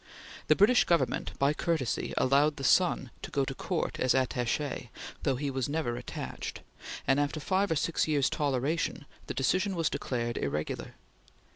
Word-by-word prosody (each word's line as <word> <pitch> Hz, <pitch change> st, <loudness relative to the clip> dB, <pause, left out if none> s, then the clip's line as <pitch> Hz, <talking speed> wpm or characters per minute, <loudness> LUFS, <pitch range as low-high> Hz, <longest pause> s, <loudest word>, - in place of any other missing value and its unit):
The -, -, +6 dB
British 220 Hz, +5 st, +5 dB
Government 170 Hz, -1 st, 0 dB
by 140 Hz, +2 st, +3 dB
courtesy 150 Hz, -8 st, -1 dB
allowed 145 Hz, +3 st, +3 dB
the 135 Hz, -, -7 dB
son 135 Hz, -4 st, +3 dB
to -, -, -6 dB
go 140 Hz, -1 st, 0 dB
to 135 Hz, -, -4 dB
Court 170 Hz, +5 st, -2 dB
as 130 Hz, 0 st, +3 dB
Attache, 130 Hz, 0 st, -1 dB, 0.3 s
though 135 Hz, -3 st, +1 dB
he 140 Hz, +2 st, -2 dB
was 130 Hz, 0 st, -2 dB
never 145 Hz, -6 st, -1 dB
attached, 120 Hz, -, -6 dB, 0.4 s
and 135 Hz, +1 st, +3 dB
after 145 Hz, +2 st, 0 dB
five 190 Hz, +5 st, +1 dB
or 160 Hz, -, +1 dB
six 160 Hz, +3 st, +1 dB
years' 145 Hz, -4 st, +2 dB
toleration, 145 Hz, +2 st, -1 dB, 0.2 s
the -, -, -4 dB
decision 185 Hz, +9 st, +1 dB
was 165 Hz, -2 st, 0 dB
declared 120 Hz, -2 st, -2 dB
irregular. 75 Hz, +2 st, -3 dB
140 Hz, 160 wpm, -30 LUFS, 130-160 Hz, 0.4 s, The